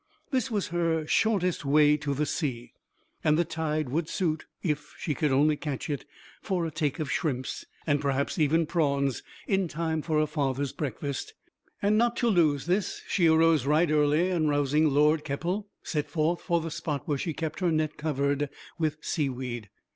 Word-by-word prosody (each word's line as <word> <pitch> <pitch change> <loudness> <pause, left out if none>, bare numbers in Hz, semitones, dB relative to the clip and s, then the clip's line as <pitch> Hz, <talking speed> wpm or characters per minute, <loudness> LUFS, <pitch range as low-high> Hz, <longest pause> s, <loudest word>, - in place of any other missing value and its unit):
This 260 -1 +1
was 210 -4 -1
her 165 -2 0
shortest 185 -2 +1
way 150 +1 +5
to 145 -2 -2
the 150 +2 0
sea, 130 -7 -3 0.5
and 155 0 +4
the 170 - +2
tide 155 -3 -2
would 155 +4 -1
suit 160 -4 -1 0.2
(if 150 -3 -2
she 150 - -2
could 150 -1 0
only 150 +3 +4
catch 145 -1 -4
it) 145 - -3 0.4
for 185 -4 -1
a 160 - -3
take 150 -2 -1
of 155 -5 -3
shrimps, 130 -5 -2 0.2
and 145 -2 +2
perhaps 140 +4 -1
even 160 +2 +3
prawns, 140 -5 0 0.2
in 195 -2 +1
time 160 0 -2
for 155 0 -1
her 155 - +4
father's 140 -2 -1
breakfast. 140 0 -4 0.5
And 210 +2 +4
not 235 0 +2
to 240 - +2
lose 155 -8 +3
this, 180 +2 -1
she 175 -4 +3
arose 160 -3 +4
right 155 +2 +3
early, 155 +4 +3
and 160 -4 +1
rousing 145 +2 +3
Lord 150 +2 +3
Keppel, 175 +8 -2 0.2
set 150 -3 -2
forth 165 +1 0
for 170 0 +1
the 165 0 -5
spot 155 -4 -3
where 145 -2 0
she 165 - -2
kept 160 -2 -4
her 180 -3 +2
net 155 -1 0
covered 145 -1 0 0.3
with 155 -2 0
sea 150 -4 0
weed. 120 -4 -5
155 Hz, 185 wpm, -28 LUFS, 145-170 Hz, 0.5 s, way